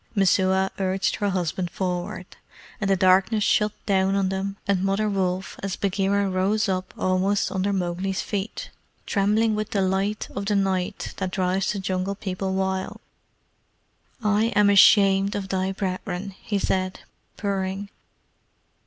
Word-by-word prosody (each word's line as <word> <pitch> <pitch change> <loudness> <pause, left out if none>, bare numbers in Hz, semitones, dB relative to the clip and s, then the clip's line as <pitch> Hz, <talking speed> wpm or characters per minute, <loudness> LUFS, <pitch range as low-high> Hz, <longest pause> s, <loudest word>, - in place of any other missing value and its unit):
Messua 190 -1 +3
urged 190 0 0
her 205 - 0
husband 180 -1 -2
forward, 180 +2 -3 0.6
and 195 - 0
the 195 - +4
darkness 190 +3 +3
shut 210 +1 +2
down 195 -1 +2
on 195 -1 +1
them 195 +1 -3
and 195 -2 +1
Mother 195 +2 +1
Wolf 190 -2 -2
as 195 -1 -3
Bagheera 200 +1 0
rose 195 +3 +1
up 185 -1 -2
almost 185 +2 +1
under 190 +1 0
Mowgli's 190 0 -2
feet, 205 0 -4 0.3
trembling 215 +2 +2
with 215 0 -2
delight 195 +1 0
of 200 0 -3
the 205 - +2
night 195 0 -1
that 190 -1 -2
drives 185 0 0
the - - -4
Jungle 190 +1 -2
People 190 -1 -3
wild. 190 0 -2 1.2
"I 210 +1 +3
am 205 -1 +5
ashamed 195 0 +5
of 195 -1 -4
thy 190 0 0
brethren," 190 0 -4
he 205 - -2
said, 185 -1 -1 0.4
purring. 195 0 -2
195 Hz, 140 wpm, -24 LUFS, 185-200 Hz, 1.2 s, am